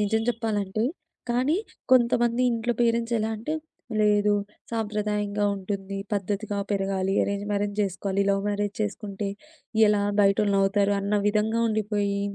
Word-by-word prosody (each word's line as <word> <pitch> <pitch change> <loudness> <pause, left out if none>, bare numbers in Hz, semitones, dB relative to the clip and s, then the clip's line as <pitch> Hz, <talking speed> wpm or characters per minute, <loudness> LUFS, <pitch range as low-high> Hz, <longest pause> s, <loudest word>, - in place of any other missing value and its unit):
నిజం 220 +2 +1
జెప్పాలంటే. 215 -3 -1 0.5
కానీ 255 +7 +2 0.3
కొంతమంది 240 -1 +4
ఇంట్లో 235 +1 0
పేరెంట్స్ 235 0 +1
ఎలా 220 +1 -1
అంటే 235 +9 -3 0.5
లేదు 210 0 +4 0.4
సాంప్రదాయంగా 210 -2 -1
ఉంటుంది, 195 0 -4 0.2
పద్ధతిగా 205 +1 -2
పెరగాలి, 195 -1 0
అరేంజ్ 200 0 -2
మ్యారేజ్ 205 0 0
చేస్కోవాలి. 195 0 -1
లవ్ 195 0 +1
మ్యారేజ్ 205 0 -1
చేస్కుంటే 205 -1 -3 0.6
ఎలా? 210 -1 +3 0.2
బయటోళ్ళునవ్వుతారు. 200 0 +3
అన్న 200 +1 -1
విధంగా 215 +2 +1
ఉండిపోయి, 205 -2 0
205 Hz, 115 wpm, -26 LUFS, 200-220 Hz, 0.6 s, కొంతమంది